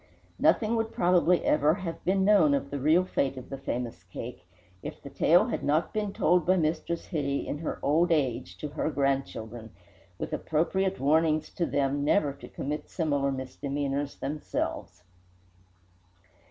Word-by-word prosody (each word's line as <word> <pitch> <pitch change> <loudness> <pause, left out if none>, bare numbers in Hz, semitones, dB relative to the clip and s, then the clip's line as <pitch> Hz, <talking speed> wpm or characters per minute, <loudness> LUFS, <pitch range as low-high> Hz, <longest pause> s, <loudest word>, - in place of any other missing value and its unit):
Nothing 225 0 +3
would 225 0 -1
probably 175 0 +3
ever 150 +2 +3
have 170 -4 -6
been 190 +1 +2
known 185 -9 +5
of 140 - -3
the 140 - -3
real 155 +6 +4
fate 135 -6 -1
of 130 +1 -9
the 135 - -4
famous 120 -6 -4
cake 90 +1 -8 0.3
if - - -7
the - - -10
tale - - +4
had - - -3
not 150 +3 +1
been 210 -2 -1
told 180 -1 +3
by 185 +3 +3
Mistress 165 +1 -1
Hitty 140 -5 -2
in 145 - -3
her 160 - -3
old 165 +5 +3
age 120 - 0
to 150 - -5
her 150 +1 -2
grandchildren, 135 -6 -2 0.5
with - - -5
appropriate 190 +5 0
warnings 155 +2 +2
to 170 - -1
them 140 0 0
never 145 -2 +2
to - - -12
commit 150 +2 -4
similar 145 -5 0
misdemeanours 140 +2 -3
themselves. 140 - -4
150 Hz, 155 wpm, -28 LUFS, 135-170 Hz, 0.5 s, known